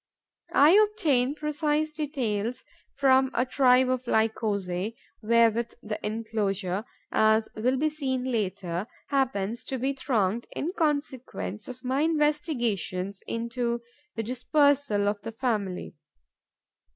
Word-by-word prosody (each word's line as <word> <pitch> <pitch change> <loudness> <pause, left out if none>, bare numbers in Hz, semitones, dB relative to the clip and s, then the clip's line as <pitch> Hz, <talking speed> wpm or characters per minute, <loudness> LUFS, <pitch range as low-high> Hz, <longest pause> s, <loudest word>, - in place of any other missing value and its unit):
I 290 +3 +7
obtain 335 - +3
precise 300 0 0
details 250 -7 -2 0.3
from 265 -1 +4
a 250 - +2
tribe 255 -1 +4
of 255 -1 -1
Lycosae 210 -3 0 0.3
wherewith 230 +1 +3
the 210 0 -5
enclosure, 210 -3 -2 0.3
as 220 0 +3
will 250 +4 +1
be 310 +3 +2
seen 265 -4 -2
later, 200 -6 -2 0.2
happens 240 -5 0
to 265 - -3
be 265 +3 0
thronged 235 -5 0
in 335 +5 -2
consequence 280 - -2
of 255 0 -9
my 260 +2 0
investigations 250 - 0
into 235 +1 -2 0.3
the 225 - -2
dispersal 255 -2 +2
of 205 0 -1
the 225 - -6
family. 215 -7 -2
245 Hz, 115 wpm, -27 LUFS, 215-280 Hz, 0.3 s, I